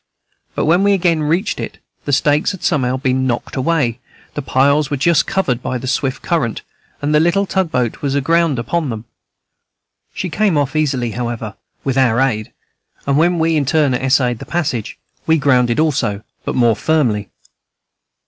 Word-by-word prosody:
But -, -, 0 dB
when 170 Hz, +4 st, +3 dB
we 200 Hz, 0 st, +4 dB
again 170 Hz, -4 st, +2 dB
reached 170 Hz, +8 st, 0 dB
it, -, -, -5 dB, 0.3 s
the 145 Hz, -, -2 dB
stakes 145 Hz, +6 st, +2 dB
had 190 Hz, -, -10 dB
somehow 130 Hz, -5 st, +1 dB
been 130 Hz, 0 st, 0 dB
knocked 120 Hz, -1 st, -3 dB
away, 130 Hz, -4 st, 0 dB, 0.3 s
the 145 Hz, -, -3 dB
piles 140 Hz, +2 st, +2 dB
were 145 Hz, -, -1 dB
just 170 Hz, +3 st, +2 dB
covered 135 Hz, -11 st, 0 dB
by 130 Hz, -, -2 dB
the 125 Hz, -, -7 dB
swift 130 Hz, 0 st, -1 dB
current, 140 Hz, -10 st, -1 dB, 0.4 s
and 150 Hz, +1 st, +1 dB
the 150 Hz, -, +5 dB
little 175 Hz, +5 st, +2 dB
tug 190 Hz, -3 st, 0 dB
boat 125 Hz, -3 st, -1 dB
was 140 Hz, -1 st, -1 dB
aground 165 Hz, +1 st, +2 dB
upon 150 Hz, +6 st, -1 dB
them. 110 Hz, -1 st, -5 dB, 1.1 s
She 180 Hz, -, -4 dB
came 200 Hz, -5 st, +1 dB
off 145 Hz, 0 st, -1 dB
easily, 130 Hz, -6 st, 0 dB
however, 115 Hz, -3 st, -4 dB, 0.3 s
with 135 Hz, -1 st, 0 dB
our 120 Hz, -3 st, +3 dB
aid, 110 Hz, -5 st, 0 dB, 0.5 s
and, 140 Hz, -, +1 dB
when 170 Hz, +4 st, +3 dB
we 165 Hz, 0 st, +1 dB
in 145 Hz, -3 st, 0 dB
turn 150 Hz, -3 st, +2 dB
essayed 125 Hz, -2 st, +1 dB
the -, -, -8 dB
passage, 140 Hz, -10 st, -2 dB, 0.3 s
we 160 Hz, 0 st, +4 dB
grounded 125 Hz, -4 st, +2 dB
also, 130 Hz, -10 st, 0 dB, 0.2 s
but -, -, -2 dB
more 120 Hz, -3 st, +3 dB
firmly. 120 Hz, -11 st, 0 dB
140 Hz, 175 wpm, -17 LUFS, 125-160 Hz, 1.1 s, the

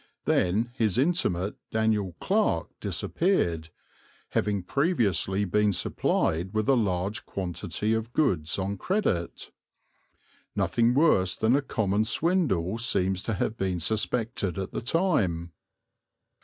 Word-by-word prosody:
Then 110 Hz, +7 st, +1 dB
his 110 Hz, -6 st, 0 dB
intimate 125 Hz, -, 0 dB
Daniel 110 Hz, -5 st, 0 dB
Clarke 195 Hz, -, +1 dB
disappeared, 85 Hz, -, 0 dB, 0.6 s
having 100 Hz, -3 st, 0 dB
previously 105 Hz, -, +1 dB
been 105 Hz, +2 st, +2 dB
supplied 90 Hz, 0 st, 0 dB
with 110 Hz, +1 st, 0 dB
a 135 Hz, -, +5 dB
large 100 Hz, -2 st, -1 dB
quantity 95 Hz, +3 st, -2 dB
of 110 Hz, +1 st, -2 dB
goods 90 Hz, -, +1 dB
on 100 Hz, +1 st, -2 dB
credit. 140 Hz, -, -2 dB, 1.0 s
Nothing 120 Hz, +1 st, +2 dB
worse 95 Hz, -, +3 dB
than 115 Hz, +4 st, +3 dB
a 145 Hz, -, +2 dB
common 105 Hz, -5 st, 0 dB
swindle 115 Hz, -, +1 dB
seems 95 Hz, -5 st, +1 dB
to 115 Hz, -, -2 dB
have 110 Hz, -, -1 dB
been 95 Hz, -4 st, -1 dB
suspected 110 Hz, 0 st, -1 dB
at 95 Hz, 0 st, -4 dB
the -, -, -4 dB
time. 110 Hz, -, 0 dB
105 Hz, 115 wpm, -27 LUFS, 90-120 Hz, 1.0 s, a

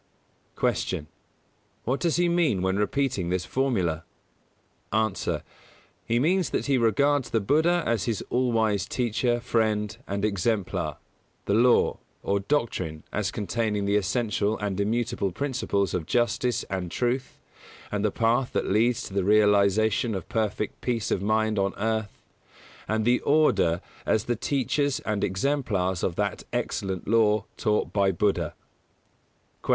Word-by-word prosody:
150. -, -, 0 dB
Q. -, -, -28 dB, 0.8 s
What 130 Hz, +4 st, -1 dB
does 170 Hz, -3 st, +1 dB
he 175 Hz, 0 st, +3 dB
mean 165 Hz, -, +2 dB
when 95 Hz, 0 st, +1 dB
repeating 120 Hz, -4 st, 0 dB
this 90 Hz, 0 st, -1 dB
formula? 95 Hz, -, 0 dB, 0.9 s
A. 110 Hz, 0 st, +2 dB, 1.0 s
He 115 Hz, -, +2 dB
means 175 Hz, +6 st, +2 dB
that -, -, -1 dB
he 135 Hz, -3 st, +2 dB
regards 140 Hz, +5 st, +2 dB
the 115 Hz, -, +1 dB
Buddha 160 Hz, -, +2 dB
as 115 Hz, -3 st, 0 dB
his 115 Hz, -4 st, -2 dB
all 125 Hz, 0 st, +2 dB
wise 110 Hz, -4 st, +1 dB
Teacher, 120 Hz, 0 st, 0 dB
Friend 110 Hz, -3 st, 0 dB
and 100 Hz, +1 st, -1 dB
Exemplar; 100 Hz, 0 st, -1 dB, 0.5 s
the 100 Hz, -, 0 dB
Law, 120 Hz, +3 st, +4 dB, 0.2 s
or 100 Hz, 0 st, +1 dB
Doctrine, 95 Hz, -, -2 dB
as 105 Hz, -2 st, 0 dB
containing 105 Hz, -1 st, -1 dB
the 100 Hz, +1 st, +1 dB
essential 105 Hz, +1 st, 0 dB
and 100 Hz, -2 st, -2 dB
immutable 115 Hz, -1 st, -1 dB
principles 120 Hz, -, -1 dB
of 85 Hz, -4 st, -2 dB
Justice 120 Hz, 0 st, +1 dB
and 95 Hz, -2 st, -4 dB
Truth 125 Hz, +6 st, -2 dB, 0.5 s
and 105 Hz, -1 st, -1 dB
the 105 Hz, -, +3 dB
path 120 Hz, +4 st, +1 dB
that -, -, 0 dB
leads 115 Hz, +4 st, +2 dB
to -, -, -8 dB
the 100 Hz, -1 st, +1 dB
realisation 105 Hz, +2 st, +3 dB
of 95 Hz, -, -5 dB
perfect 105 Hz, -1 st, -2 dB
peace 120 Hz, -4 st, -1 dB
of -, -, +1 dB
mind 110 Hz, +1 st, +1 dB
on 100 Hz, 0 st, 0 dB
earth; 110 Hz, 0 st, -2 dB, 0.6 s
and 110 Hz, 0 st, 0 dB
the 120 Hz, +1 st, +4 dB
Order 145 Hz, -, +3 dB, 0.3 s
as 110 Hz, -, +2 dB
the 120 Hz, -, -1 dB
teachers 140 Hz, +3 st, 0 dB
and 105 Hz, -2 st, -2 dB
exemplars 95 Hz, -, 0 dB
of 85 Hz, -, -1 dB
that 100 Hz, 0 st, -2 dB
excellent 95 Hz, -2 st, -3 dB
Law 110 Hz, -1 st, +3 dB
taught 105 Hz, -2 st, 0 dB
by 100 Hz, -2 st, +3 dB
Buddha. 90 Hz, -3 st, 0 dB, 1.1 s
151. -, -, -11 dB
110 Hz, 145 wpm, -26 LUFS, 100-120 Hz, 1.1 s, Law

